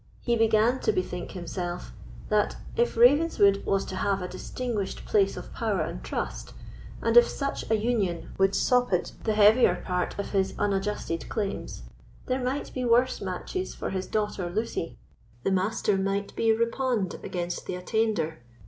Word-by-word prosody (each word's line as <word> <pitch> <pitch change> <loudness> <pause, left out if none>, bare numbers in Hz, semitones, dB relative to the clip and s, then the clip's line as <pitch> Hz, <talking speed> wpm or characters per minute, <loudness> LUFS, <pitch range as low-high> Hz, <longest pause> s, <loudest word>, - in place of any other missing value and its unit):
He 235 - +1
began 225 +2 +3
to - - +2
bethink 180 -1 -3
himself, 175 -1 -5 0.4
"That 210 -1 +2 0.2
if 475 - +1
Ravenswood 240 -6 +5
was 195 0 +1
to 185 - -5
have 195 0 +1
a - - -3
distinguished 230 -1 -4
place 200 -2 +2
of - - -8
power 215 -6 0
and - - -4
trust, - - -4 0.5
and 230 0 +1
if 240 0 +9
such 275 -1 -3
a 220 - +4
union 210 -6 -1
would 195 0 +3
sopite 245 -3 +2
the 215 -2 +1
heavier 210 -2 +6
part 180 -1 -1
of 200 - -4
his 195 -1 0
unadjusted 195 -4 -1
claims, 200 - -3 0.4
there 255 0 -1
might 265 +3 -2
be 255 - -2
worse 245 +2 +3
matches 195 - -4
for - - -4
his 190 -1 -3
daughter 210 -4 -1
Lucy: 210 -3 -3 0.5
the - - +1
Master 195 +2 +1
might 195 +1 -2
be 225 0 +3
reponed 230 -3 0
against 175 -1 -4
the - - -2
attainder. 180 -4 -1
205 Hz, 155 wpm, -27 LUFS, 185-230 Hz, 0.5 s, if